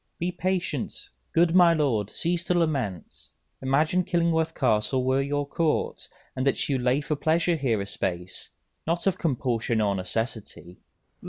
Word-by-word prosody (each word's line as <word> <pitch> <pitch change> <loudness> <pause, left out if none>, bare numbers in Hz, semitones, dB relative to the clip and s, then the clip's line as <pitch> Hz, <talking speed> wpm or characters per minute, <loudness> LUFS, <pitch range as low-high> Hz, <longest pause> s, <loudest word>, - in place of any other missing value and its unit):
_ - - -48
Be 175 +1 -1
patient, 180 -8 -3 0.2
good 165 0 +3
my 175 -2 +6
lord, 120 -10 +1
cease 170 +6 -1
to 180 - +1
lament; 135 - -1 0.5
Imagine 150 +7 +2
Killingworth 165 -2 +1
Castle 125 +1 +1
were 130 +1 +2
your 145 +1 -1
court, 160 +1 -1 0.3
And 130 - -1
that 135 -1 +1
you 135 -3 0
lay 125 +3 +2
for 150 +1 -2
pleasure 165 +3 +1
here 130 -8 0
a 100 - -3
space, 90 -2 -4 0.4
Not 170 +1 0
of 190 -2 +1
compulsion 120 -6 0
or 105 -2 +2
necessity. 100 -2 -5
140 Hz, 155 wpm, -26 LUFS, 115-170 Hz, 0.5 s, my